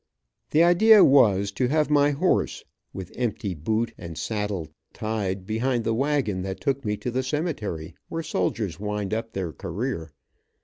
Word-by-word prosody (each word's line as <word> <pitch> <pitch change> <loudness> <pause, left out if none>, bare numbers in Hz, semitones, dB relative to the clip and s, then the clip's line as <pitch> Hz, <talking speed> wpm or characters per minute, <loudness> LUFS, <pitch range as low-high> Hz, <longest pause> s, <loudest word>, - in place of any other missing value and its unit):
The 160 +2 +4
idea 200 +5 +7
was 100 -8 +5
to 125 +5 0
have 150 +2 +1
my 145 -1 +5
horse, 155 +6 0 0.3
with 95 -2 -8
empty 115 -5 -2
boot 110 +9 -1
and 85 -2 -8
saddle 105 -6 -2 0.3
tied 100 -4 -3
behind 120 +3 0
the 115 - 0
wagon 135 -6 0
that 95 0 -4
took 140 -1 -1
me 105 -2 -1
to 125 - -4
the 130 +2 0
cemetery 130 - -3 0.2
where 165 0 -3
soldiers 95 - -2
wind 105 -1 -3
up 115 +1 -3
their 90 -5 -3
career. 95 -2 -4
110 Hz, 160 wpm, -25 LUFS, 95-135 Hz, 0.3 s, idea